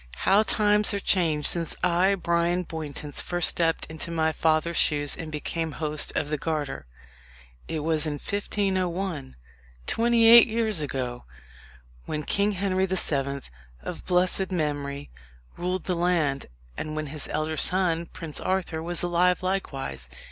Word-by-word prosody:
how 200 Hz, +2 st, +5 dB
times 210 Hz, -1 st, +2 dB
are -, -, -1 dB
changed 160 Hz, -7 st, +1 dB
since 170 Hz, -2 st, +4 dB
I, 180 Hz, +2 st, +3 dB
Bryan 170 Hz, 0 st, 0 dB
Bowntance, 150 Hz, -3 st, -5 dB
first 175 Hz, -1 st, +3 dB
stepped 165 Hz, -1 st, 0 dB
into 160 Hz, +1 st, -7 dB
my 160 Hz, -1 st, +1 dB
father's 160 Hz, +1 st, +1 dB
shoes, 145 Hz, -2 st, +2 dB
and 160 Hz, -1 st, -7 dB
became 160 Hz, +1 st, -3 dB
host 150 Hz, -1 st, -1 dB
of 145 Hz, -, -1 dB
the 150 Hz, -, -1 dB
Garter. 150 Hz, -, -3 dB, 0.8 s
It 160 Hz, -2 st, -3 dB
was 160 Hz, -1 st, +1 dB
in 150 Hz, -, -2 dB
1501 185 Hz, -3 st, -2 dB, 0.5 s
twenty 230 Hz, 0 st, +2 dB
eight 235 Hz, +1 st, +9 dB
years 220 Hz, -6 st, 0 dB
ago 125 Hz, -4 st, -4 dB, 0.8 s
when 150 Hz, -1 st, -3 dB
King 205 Hz, +6 st, +1 dB
Henry 190 Hz, 0 st, 0 dB
the 190 Hz, 0 st, -1 dB
Seventh, 140 Hz, -, -1 dB, 0.3 s
of -, -, -6 dB
blessed 180 Hz, +1 st, +2 dB
memory, 145 Hz, -4 st, -3 dB, 0.4 s
ruled 180 Hz, +1 st, -3 dB
the 185 Hz, -, -1 dB
land, 170 Hz, -6 st, 0 dB, 0.3 s
and 155 Hz, -, -5 dB
when 155 Hz, 0 st, -3 dB
his 150 Hz, -, -2 dB
elder 155 Hz, +1 st, -2 dB
son, 170 Hz, -1 st, +2 dB
Prince 165 Hz, -4 st, -5 dB
Arthur, 185 Hz, -4 st, -2 dB
was 175 Hz, +1 st, -1 dB
alive 180 Hz, +1 st, +2 dB
likewise. 135 Hz, -, -3 dB
170 Hz, 145 wpm, -26 LUFS, 150-185 Hz, 0.8 s, eight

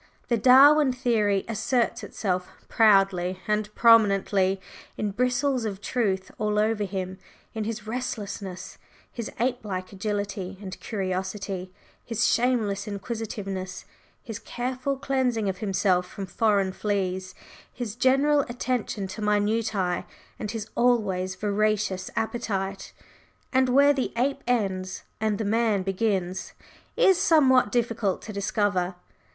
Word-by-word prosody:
The 235 Hz, -, +3 dB
Darwin 270 Hz, +4 st, +7 dB
theory 215 Hz, -6 st, +1 dB
asserts 230 Hz, +2 st, 0 dB
itself 180 Hz, -3 st, -2 dB, 0.2 s
proudly 195 Hz, -4 st, +3 dB
and 210 Hz, 0 st, 0 dB
prominently 200 Hz, -4 st, +4 dB, 0.4 s
in 210 Hz, -1 st, -1 dB
bristles 250 Hz, +3 st, +1 dB
of 200 Hz, -3 st, -3 dB
truth 200 Hz, -4 st, -1 dB
all 210 Hz, 0 st, 0 dB
over 215 Hz, 0 st, +1 dB
him 190 Hz, -1 st, -5 dB, 0.3 s
in 220 Hz, -1 st, -3 dB
his 220 Hz, -1 st, -4 dB
restlessness, 205 Hz, -5 st, -5 dB, 0.3 s
his 235 Hz, -2 st, -5 dB
ape 245 Hz, 0 st, 0 dB
like 185 Hz, -2 st, -5 dB
agility 200 Hz, -1 st, -3 dB
and 190 Hz, -2 st, -8 dB
curiosity, 190 Hz, -1 st, -3 dB, 0.3 s
his 230 Hz, -2 st, 0 dB
shameless 220 Hz, -5 st, +1 dB
inquisitiveness, 200 Hz, -3 st, -5 dB, 0.4 s
his 225 Hz, -4 st, -6 dB
careful 255 Hz, +3 st, -3 dB
cleansing 255 Hz, -6 st, 0 dB
of 190 Hz, -1 st, -2 dB
himself 185 Hz, -3 st, +1 dB
from 195 Hz, -, -6 dB
foreign 200 Hz, 0 st, +1 dB
fleas, 185 Hz, -2 st, -2 dB, 0.4 s
his 235 Hz, -4 st, -5 dB
general 275 Hz, +4 st, +3 dB
attention 240 Hz, -4 st, -2 dB
to 190 Hz, +3 st, -7 dB
minutiæ, 210 Hz, -3 st, 0 dB, 0.3 s
and 210 Hz, -, -4 dB
his 220 Hz, -1 st, -4 dB
always 195 Hz, -7 st, +1 dB
voracious 205 Hz, -1 st, 0 dB
appetite; 195 Hz, -4 st, -3 dB, 0.6 s
and 260 Hz, 0 st, +3 dB
where 280 Hz, +3 st, +6 dB
the 265 Hz, -3 st, -2 dB
ape 275 Hz, +3 st, 0 dB
ends 190 Hz, -6 st, -1 dB, 0.2 s
and 215 Hz, -1 st, 0 dB
the 220 Hz, -, -2 dB
man 215 Hz, -2 st, +1 dB
begins 190 Hz, -2 st, -1 dB, 0.4 s
is 385 Hz, -7 st, +5 dB
somewhat 260 Hz, -8 st, +5 dB
difficult 230 Hz, -5 st, 0 dB
to 215 Hz, -, -7 dB
discover. 200 Hz, -2 st, 0 dB
210 Hz, 120 wpm, -26 LUFS, 195-235 Hz, 0.6 s, Darwin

